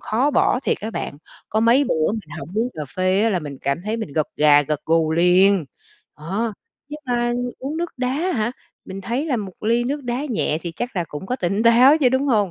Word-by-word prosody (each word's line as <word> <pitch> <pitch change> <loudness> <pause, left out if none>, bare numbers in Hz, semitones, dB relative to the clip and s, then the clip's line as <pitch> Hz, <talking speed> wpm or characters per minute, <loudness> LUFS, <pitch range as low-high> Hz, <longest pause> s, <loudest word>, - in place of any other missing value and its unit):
khó 255 +7 +1
bỏ 255 -2 +2
thiệt - - -1
á 220 - -4
bạn, 145 - -5 0.3
có 220 - 0
mấy 240 +5 +4
bữa 160 -6 +1
mình 210 -9 -6
hổng - - -7
uống 230 +3 +1
cà 155 - -5
phê 185 +2 +2
á 225 - +3
là 185 - +1
mình 145 -4 -7
cảm 140 +3 -1
thấy 220 +2 -2
mình 220 -11 -5
gật 155 0 0
gà, 145 -1 +6
gật 150 0 -2
gù 160 -1 +2
liền. 180 +2 +4 0.5
Đó, 200 +9 -2 0.4
nhưng 300 +1 -8
mà 240 -1 0 0.3
uống 280 +4 -4
nước 345 +1 -2
đá 250 0 -1
hả? 265 -6 -1 0.3
Mình 190 +1 -7
thấy 240 +9 -2
là 270 -6 0
một 200 -4 -5
ly 235 +2 +2
nước 285 +3 -2
đá 245 +4 -2
nhẹ 215 - -1
thì 170 -2 -5
chắc 240 -4 -4
là 175 - 0
cũng 150 +5 -7
có 250 - -2
tỉnh 195 +3 -1
táo 250 +6 +6
chứ, 260 -4 +4
đúng 260 +2 +1
hông? 210 -8 +2
220 Hz, 235 wpm, -21 LUFS, 175-250 Hz, 0.5 s, gà